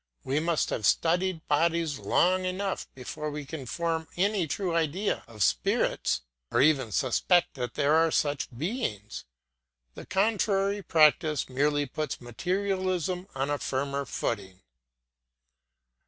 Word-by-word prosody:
We 135 +3 0
must 165 0 0
have 105 - 0
studied 175 0 +1
bodies 160 -1 +1
long 185 +1 +2
enough 185 +1 -2
before 150 +4 -5
we 150 -1 -5
can 140 -2 -7
form 165 +2 -2
any 195 -2 +1
true 180 +3 -2
idea 170 +5 0
of 110 -4 -2
spirits, - - +1 0.3
or 120 - +1
even 135 -5 +3
suspect 170 - +2
that 125 -4 -5
there 145 +2 +2
are 165 +1 +4
such 145 -3 0
beings. 120 - -4 0.7
The - - -10
contrary 200 0 +1
practice 155 -3 +3
merely 145 +2 +1
puts 155 +3 -4
materialism 185 - -2
on 135 +2 -1
a 145 - -1
firmer 140 +1 -2
footing. 95 -7 -4
155 Hz, 125 wpm, -28 LUFS, 135-185 Hz, 0.7 s, are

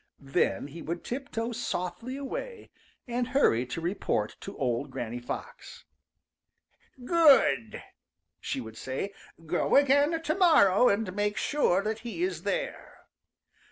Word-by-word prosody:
Then 135 0 0
he 165 +4 -9
would 170 +2 -5
tiptoe 245 -3 -4
softly 230 +2 -4
away 450 - -6 0.4
and 240 0 -1
hurry 190 - +2
to 125 - -4
report 165 - -1
to - - -9
old 120 -3 -1
Granny 120 +1 -5
Fox. 120 - -8 1.2
"Good!" 265 - +4 0.6
she 130 - -3
would 110 -2 -9
say. 135 +10 -4 0.3
"Go 170 +3 +1
again, 285 +3 +4
to 320 -1 -1
morrow 250 - +5
and 200 -2 -1
make 205 0 0
sure 200 -10 +1
that 215 +1 -2
he 240 +9 -4
is. 370 - -2
there." - - -4
215 Hz, 125 wpm, -28 LUFS, -, 1.2 s, morrow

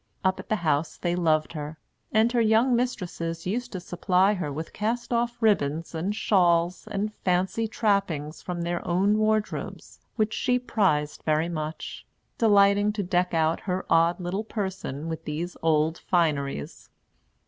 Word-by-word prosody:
Up 190 0 +1
at - - -9
the 215 - +2
house 150 +1 +1
they 175 -1 -1
loved 155 -3 +1
her; 150 0 -6 0.3
and 220 +2 +3
her 240 -1 +2
young 225 +3 +4
mistresses 175 -9 -3
used 245 +6 -2
to 185 - -3
supply 180 +3 +2
her 180 -7 -3
with 155 +3 -6
cast 235 +3 -2
off 240 0 0
ribbons 165 -9 +1
and 180 +6 -2
shawls 175 -3 +2
and 210 +1 -2
fancy 190 +5 0
trappings 195 -9 -1
from 175 -1 -4
their 175 0 -2
own 195 +5 +2
wardrobes, 215 0 -2 0.2
which 215 -1 0
she 250 -1 +1
prized 170 -12 0
very 155 +2 +1
much, 155 -1 -5 0.4
delighting 205 -1 +5
to 205 -1 -2
deck 180 -1 0
out 160 0 +2
her 185 +1 -1
odd 165 +2 +4
little 185 +4 -2
person 190 - -4
with 165 -1 -5
these 165 +4 -4
old 160 0 +2
fineries. 145 - -1
180 Hz, 155 wpm, -26 LUFS, 165-210 Hz, 0.4 s, delighting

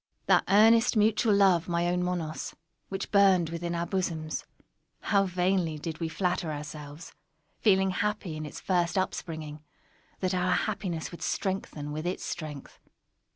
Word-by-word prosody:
That - - +4
earnest 225 +4 +5
mutual 215 0 +3
love, 185 -4 +4
my 170 0 +1
own 180 0 +1
Monos, 175 -3 -3 0.3
which 195 0 -4
burned 190 -5 +4
within 170 +1 -3
our 170 0 -1
bosoms—how 180 +3 -3
vainly 180 -3 0
did 160 +1 -5
we 165 -1 -2
flatter 180 -1 -1
ourselves, 150 +1 -8 0.5
feeling 190 -3 +4
happy 200 -3 -2
in 155 - -5
its 150 - -7
first 175 -1 0
up 190 0 +1
springing, 155 -3 -7 0.6
that 185 0 0
our 180 0 +2
happiness 185 -6 -2
would 170 - -10
strengthen 185 -7 -3
with 155 +3 -3
its 180 - -3
strength! 150 -5 -6
180 Hz, 145 wpm, -28 LUFS, 160-195 Hz, 0.6 s, earnest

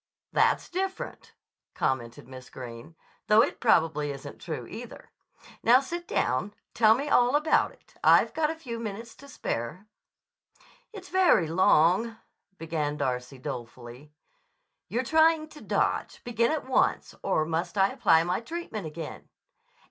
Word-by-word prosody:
"That's - - +2
different," 380 +2 -5 0.4
commented 120 -3 -2
Miss 130 -1 -11
Greene, 120 +4 -10 0.3
"though 215 +2 +6
it 280 - -3
probably 160 - +2
isn't 140 -1 -8
true, - - -5
either. - - -10 0.5
Now 240 +3 +6
sit 345 +6 -6
down. 130 +12 -1 0.2
Tell 220 -1 +5
me 280 +4 -3
all 245 -1 +4
about 300 +2 +2
it. - - -24
I've - - +5
got 310 -1 +1
a 320 - -3
few 245 -8 -7
minutes 225 +1 -6
to 280 - -14
spare." 175 - -4 1.1
"It's 385 -4 -10
very 360 - +4
long," 185 +6 +3 0.4
began 155 -3 -3
Darcy 130 -1 -3
dolefully. 125 +1 -8 0.8
"You're 235 +7 -1
trying 315 +2 +3
to 305 - -13
dodge. - - -1
Begin 235 +1 +1
at 310 -2 -2
once. 260 - +1
Or 155 - +1
must 165 +4 -3
I 195 0 +4
apply 165 0 +3
my 180 +2 -1
treatment 270 - -6
again?" 155 0 -8
195 Hz, 140 wpm, -27 LUFS, -, 1.1 s, though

